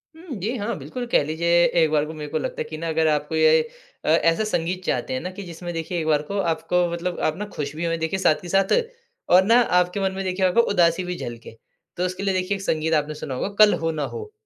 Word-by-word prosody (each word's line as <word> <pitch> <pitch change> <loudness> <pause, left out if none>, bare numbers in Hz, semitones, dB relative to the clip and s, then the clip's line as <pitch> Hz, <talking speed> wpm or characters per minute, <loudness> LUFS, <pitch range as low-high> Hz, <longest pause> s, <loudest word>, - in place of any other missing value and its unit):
हुँ। 325 -5 -8
जी 225 +8 -2
हाँ, 210 0 -3
बिल्कुल 155 - -6
कह - - +4
लीजिए 170 +3 +2 0.2
एक 160 - +3
बार 150 -1 +2
को 160 - -7
मेरे 150 -1 -7
को 160 - 0
लगता - - -4
है - - +1
कि 155 - -6
ना 165 +1 -4
अगर 160 0 +1
आपको 150 +1 0
ये 160 0 +5 0.4
अ, - - -5
ऐसा 165 +4 +3
संगीत 185 -2 -2
चाहते 125 0 -1
हैं 130 - -1
ना 180 - -4
कि 200 +1 -8
जिसमें 175 0 -7
देखिए 165 +1 -3
एक 155 - -3
बार 150 -1 +3
को 200 +7 -5 0.2
आपको 180 +2 0
मतलब 175 +1 -3
आप 155 - -5
ना 210 - -4
खुश 145 0 -4
भी 170 +2 -3
होएँ, 165 0 0
देखिए 165 +4 -2
साथ 155 -4 +2
के 175 - -9
साथ 195 +1 +2 0.6
और 185 +1 +7
ना 230 +4 +5 0.2
आपके 180 +3 -1
मन 190 0 +1
में 195 - -3
देखिए 185 0 0
आपको 185 +6 +4
उदासी 170 0 +3
भी 180 0 -4
झलके। 115 -1 -8 0.4
तो 180 - 0
उसके 185 +2 -4
लिए 195 -1 +1
देखिए 185 +2 0
एक 195 - -9
संगीत 160 -2 0
आपने 150 0 +1
सुना 140 -3 -6
होगा 195 - -2
कल 210 - +6
हो 165 0 -1
ना 155 -2 -3
हो। 435 -2 -7
170 Hz, 265 wpm, -23 LUFS, 155-190 Hz, 0.6 s, और